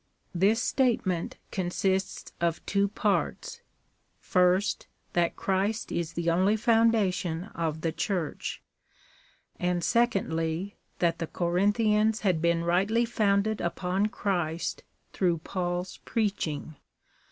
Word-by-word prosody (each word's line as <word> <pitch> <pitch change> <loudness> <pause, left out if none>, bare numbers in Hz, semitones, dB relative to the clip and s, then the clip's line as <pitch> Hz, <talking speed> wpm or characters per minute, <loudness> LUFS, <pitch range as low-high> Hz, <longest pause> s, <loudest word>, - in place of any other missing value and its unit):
This 205 +6 +3
statement 220 -10 0
consists 190 +1 -1
of 170 -1 0
two 200 0 +2
parts; 205 0 -1 0.6
first, 180 +2 +2 0.3
that 170 -1 +1
Christ 200 +3 -1
is 170 -2 -2
the 170 0 -3
only 185 +5 +3
founda 225 -3 +3
tion 170 -2 -3
of 160 -2 -2
the 165 - 0
Church; 170 0 -3 1.0
and 180 -1 0
secondly, 195 -6 0 0.2
that 170 -1 +1
the 165 - -2
Corinthians 210 +6 +2
had 180 -6 +1
been 170 0 +2
rightly 195 +7 +2
founded 215 -2 +1
upon 180 +3 0
Christ 175 -6 -2 0.3
through 175 -3 +1
Paul's 175 +2 -3
preaching. 160 - -2
185 Hz, 105 wpm, -28 LUFS, 170-210 Hz, 1.0 s, This